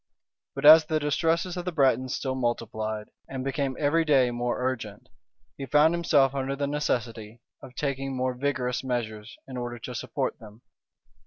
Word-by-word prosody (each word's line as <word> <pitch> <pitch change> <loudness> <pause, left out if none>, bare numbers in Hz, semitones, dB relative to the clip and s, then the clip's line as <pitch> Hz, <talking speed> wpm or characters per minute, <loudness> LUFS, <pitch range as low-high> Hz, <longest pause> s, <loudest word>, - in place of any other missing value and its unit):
But - - -3
as 155 +1 +10
the 155 0 0
distresses 165 +4 0
of 175 - -4
the 180 - -2
Bretons 130 -4 +2
still 130 -1 -2
multiplied, 110 -4 -3 0.2
and 130 -1 -5
became 135 0 -2
every 155 +2 +2
day 135 -5 +3
more 120 0 -2
urgent, 120 -5 -4 0.5
he 135 - -6
found 150 +5 +4
himself 150 -6 +3
under 135 0 -2
the 140 0 -2
necessity 120 -6 -3 0.2
of 125 - -12
taking 135 -1 -3
more 130 0 0
vigorous 125 -1 -2
measures, 110 -4 -4
in 130 -1 -7
order 120 -1 -4
to 115 - -7
support - - -3
them. 110 +1 -14
130 Hz, 165 wpm, -27 LUFS, 120-145 Hz, 0.5 s, as